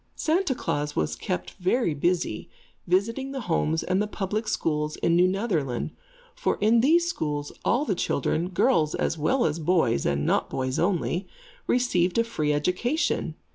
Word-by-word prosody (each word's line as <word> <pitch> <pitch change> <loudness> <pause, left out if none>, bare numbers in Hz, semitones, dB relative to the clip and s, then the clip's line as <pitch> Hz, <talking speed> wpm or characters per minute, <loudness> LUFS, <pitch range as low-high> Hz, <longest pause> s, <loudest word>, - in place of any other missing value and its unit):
Santa 325 -3 +1
Klaas 150 -9 -2
was 80 -1 0
kept 90 0 -4
very 185 0 +1
busy 165 -6 -1 0.4
visiting 230 +9 0
the 270 - -4
homes 160 -4 0
and 185 +2 +1
the 210 - 0
public 210 +2 -3
schools 150 -6 -1
in 170 - +1
New 180 +1 +5
Netherland; 185 - -1 0.4
for - - -1
in 225 +2 +4
these 335 +6 +4
schools 150 - -3
all 265 +5 +2
the 205 - +1
children, 170 0 -1
girls 160 -3 +2
as - - 0
well 240 - +2
as 155 +1 0
boys, 155 - +2
and 70 +1 0
not - - +1
boys 130 0 -2
only, 180 0 0 0.4
received 185 -8 +1
a 230 - +4
free 155 -10 -1
education. 180 - 0
180 Hz, 160 wpm, -26 LUFS, 150-230 Hz, 0.4 s, New